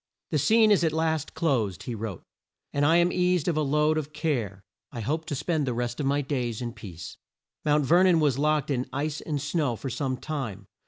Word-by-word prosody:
"The 155 - +2
scene 220 +8 +5
is 195 -4 +4
at 160 -2 +2
last 160 -1 -1
closed," 115 - 0
he 120 - -4
wrote, 110 -4 -5 0.5
"and 145 +1 +2
I 165 - +5
am 175 +1 +4
eased 180 -2 +1
of 170 - +1
a 155 - +1
load 150 +2 +2
of 150 0 -7
care. 120 - -2 0.3
I 120 - -6
hope 155 +8 -2
to 145 - -3
spend 155 0 -1
the 125 - -1
rest 120 0 -3
of 140 - 0
my 140 +1 +2
days 125 -5 -2
in 120 -2 -4
peace." 85 -6 -9 0.5
Mount 150 -1 +3
Ver 170 +6 +5
non 180 -3 +5
was 140 -4 +2
locked 150 0 +1
in 130 -2 -1
ice 150 +2 -2
and 150 -3 -3
snow 145 -3 0
for 130 +3 -5
some 130 +1 -2
time. 120 -11 -5
145 Hz, 220 wpm, -27 LUFS, 125-160 Hz, 0.5 s, scene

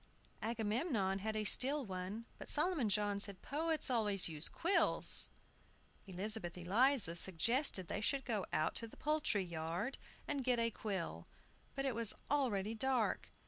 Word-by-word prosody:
Agamemnon 220 - -1
had 215 +2 -3
a 215 - -1
steel 270 +6 +5
one, 190 +4 -6
but - - -8
Solomon 300 - +3
John 205 0 +1
said, 200 -2 -2
"Poets 320 +2 -1
always 210 -7 +1
used 155 -1 0
quills." 350 +4 +1 0.8
Elizabeth 190 -1 -2
Eliza 205 +1 +2
suggested 190 - +2
that - - -5
they 205 - -3
should 270 +5 0
go 215 -5 -1
out 155 +1 0
to 230 - -4
the - - -16
poultry 295 -9 0
yard 170 +7 -4 0.3
and 280 -2 -2
get 250 -1 +1
a 230 0 0
quill. 195 -6 -5 0.5
But 275 0 -2
it 265 - 0
was 230 -2 +3 0.2
already 225 -8 0
dark. 250 0 -1
220 Hz, 150 wpm, -36 LUFS, 195-265 Hz, 0.8 s, steel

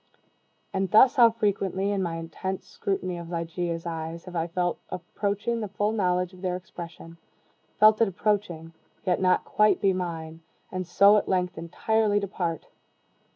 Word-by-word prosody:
And 190 -1 0
thus 245 +7 +6
how 235 -2 +8
frequently, 200 -3 -1
in 200 -1 0
my 170 -3 -2
intense 185 +3 -5
scrutiny 185 -3 -3
of 170 -1 -8
Ligeia's 170 0 -3
eyes, 165 0 -5
have 180 -1 -9
I 165 0 0
felt 175 +1 -1
approaching 205 +5 -2
the 210 - -3
full 205 +2 -1
knowledge 180 -3 0
of 185 - -14
their 180 -2 -1
expression 170 -2 -10 0.6
felt 215 +1 +6
it 225 - +5
approaching 180 -4 -2 0.3
yet 180 -1 +1
not 185 -1 +3
quite 210 0 +3
be 195 -1 +3
mine 165 -3 -5 0.3
and 185 -1 -4
so 200 +4 +6
at - - -1
length 180 -1 0
entirely 205 +6 0
depart! 180 -5 -3
185 Hz, 155 wpm, -26 LUFS, 170-205 Hz, 0.6 s, how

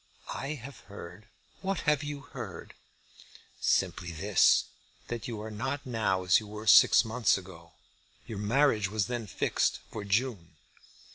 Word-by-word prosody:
"I 135 +4 -4
have 140 +1 -10
heard 100 +1 -10 0.2
" - - -32
"What 195 -2 -2
have 150 -1 +2
you 145 -1 -5
heard?" 140 - -8 0.9
"Simply 85 - 0
this, 95 +4 +4 0.5
that 120 -2 -4
you 115 -3 -5
are 110 - -6
not 135 +6 -3
now 110 -7 0
as 90 -1 +5
you 110 - -10
were 105 +1 -8
six 115 - +7
months 115 0 +2
ago. 85 -3 -12 0.5
Your 110 -3 -6
marriage 110 -2 +2
was 105 -1 0
then 120 -3 -4
fixed - - 0
for 105 - -5
June." 100 -5 -1
110 Hz, 150 wpm, -29 LUFS, 100-130 Hz, 0.9 s, six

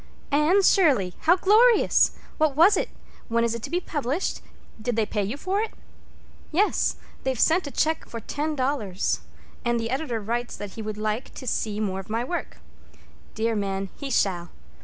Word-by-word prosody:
"Anne 310 +8 +4
Shirley! 270 - +4 0.2
How 350 - +9
glorious! 435 +5 +5 0.3
What 305 -3 +2
was 345 +7 +6
it? - - -1 0.4
When 230 0 +1
is 235 -1 +1
it 235 - -4
to - - -6
be 350 - +1
published? 295 -1 -2 0.4
Did 240 +1 -1
they 225 -1 +2
pay 210 0 -2
you 215 +8 -3
for 380 +6 -1
it?" 445 - -4 0.8
"Yes; 385 +7 +2 0.3
they've 260 -3 -2
sent 330 0 +3
a - - -6
check 320 +3 0
for 230 - -5
ten 300 +7 -3
dollars, 255 -9 0 0.4
and 240 -1 +1
the 230 +1 -3
editor 265 -4 -1
writes 235 +3 -3
that 205 -1 -6
he 225 - -7
would 215 -1 -5
like 215 +3 -2
to 260 - -8
see 215 -3 -1
more 190 -3 -1
of 195 - -9
my 225 +2 0
work. 330 - -4 0.8
Dear 225 +1 0
man, 195 -1 -2
he 280 - -6
shall. 180 -8 +1
245 Hz, 180 wpm, -25 LUFS, 215-315 Hz, 0.8 s, How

